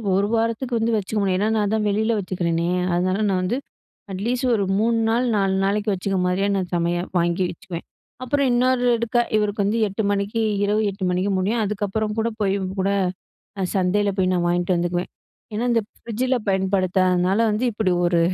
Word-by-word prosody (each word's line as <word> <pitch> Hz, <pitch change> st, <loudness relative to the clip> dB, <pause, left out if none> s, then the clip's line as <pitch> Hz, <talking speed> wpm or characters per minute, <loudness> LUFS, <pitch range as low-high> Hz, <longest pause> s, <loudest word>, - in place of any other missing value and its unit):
ஒரு 200 Hz, +1 st, +2 dB
வாரத்துக்கு 230 Hz, +2 st, 0 dB
வந்து 225 Hz, +1 st, +1 dB
வச்சுக்க 210 Hz, +1 st, -3 dB
முடியும். 190 Hz, -2 st, +1 dB
ஏனா 210 Hz, -, +1 dB
நான் 210 Hz, 0 st, 0 dB
தான் 215 Hz, -1 st, 0 dB
வெளியில 220 Hz, +3 st, +1 dB
வச்சுக்கிறேனே. 170 Hz, -3 st, -1 dB, 0.2 s
அதனால 185 Hz, +2 st, +1 dB
நான் 185 Hz, -1 st, +1 dB
வந்து 200 Hz, +7 st, 0 dB, 0.5 s
அட்லீஸ்ட் 240 Hz, +7 st, -1 dB
ஒரு 205 Hz, -, 0 dB, 0.2 s
3 230 Hz, +1 st, +2 dB
நாள், 235 Hz, +3 st, +2 dB
4 195 Hz, -1 st, +1 dB
நாளைக்கு 205 Hz, +2 st, 0 dB
வச்சுக்க 195 Hz, +1 st, -2 dB
மாரியே 185 Hz, +2 st, +1 dB
நான் 185 Hz, -2 st, -2 dB
சமையல் 175 Hz, +1 st, -1 dB
வாங்கி 170 Hz, +2 st, +1 dB
வச்சுக்குவேன். 170 Hz, 0 st, -8 dB, 0.4 s
அப்புறம் 280 Hz, +2 st, +1 dB
இன்னொருக்கா 240 Hz, -1 st, +2 dB, 0.2 s
இவருக்கு 210 Hz, -1 st, 0 dB
வந்து 210 Hz, +3 st, +1 dB
8 200 Hz, +3 st, -3 dB
மணிக்கு, 200 Hz, +3 st, -1 dB, 0.2 s
இரவு 210 Hz, +2 st, +1 dB
8 195 Hz, -1 st, -4 dB
மணிக்கு 185 Hz, +3 st, 0 dB
முடியும். 220 Hz, +5 st, 0 dB
அதுக்கப்புறம் 210 Hz, +1 st, -2 dB
கூட 220 Hz, -, +1 dB
போய் 195 Hz, -1 st, +2 dB, 0.3 s
கூட 195 Hz, -, +1 dB, 0.9 s
சந்தையில 200 Hz, +2 st, +2 dB
போய் 185 Hz, -1 st, +2 dB
நான் 175 Hz, -1 st, +1 dB
வாங்கிட்டு 175 Hz, +1 st, +1 dB
வந்துக்குவேன். 175 Hz, +1 st, -1 dB, 0.4 s
ஏனா, 220 Hz, +3 st, -1 dB
இந்த 230 Hz, -1 st, +2 dB, 0.2 s
ஃப்ரிட்ஜில 250 Hz, +3 st, -1 dB
பயன்படுத்தாததுனால 185 Hz, -1 st, +2 dB
வந்து, 215 Hz, +4 st, -1 dB
இப்டி 205 Hz, -3 st, 0 dB
ஒரு 175 Hz, -1 st, +2 dB
200 Hz, 165 wpm, -22 LUFS, 185-225 Hz, 0.9 s, ஒரு